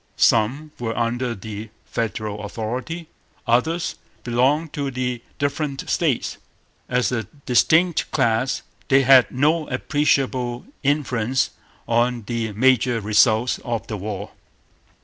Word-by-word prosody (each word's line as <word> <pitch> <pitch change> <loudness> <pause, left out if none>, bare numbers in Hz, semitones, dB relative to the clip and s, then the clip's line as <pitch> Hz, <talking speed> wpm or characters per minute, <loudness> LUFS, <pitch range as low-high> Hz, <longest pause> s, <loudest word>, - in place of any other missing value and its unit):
Some 130 +8 +2
were 115 -2 -3
under 120 +1 -1
the 105 +2 -7 0.2
Federal 110 -2 -3
authority. 125 +11 -4 0.4
Others 160 +9 +1 0.3
belonged 135 +6 +1
to 140 -2 -2
the 125 -2 -3 0.2
different 140 -1 -2
States. - - 0 0.5
As 125 0 +1
a 115 -3 -1 0.2
distinct 160 +7 +3
class 120 +3 +1 0.2
they 135 0 +5
had 130 -1 +7
no 150 +5 +1
appreciable 130 -3 0 0.2
influence 130 -4 +1 0.4
on 120 0 +1
the 115 0 -2
major 125 +1 +3
results 110 +3 +3
of 115 -2 -3
the 110 - -4
war. 100 0 -5
125 Hz, 110 wpm, -22 LUFS, 115-135 Hz, 0.5 s, had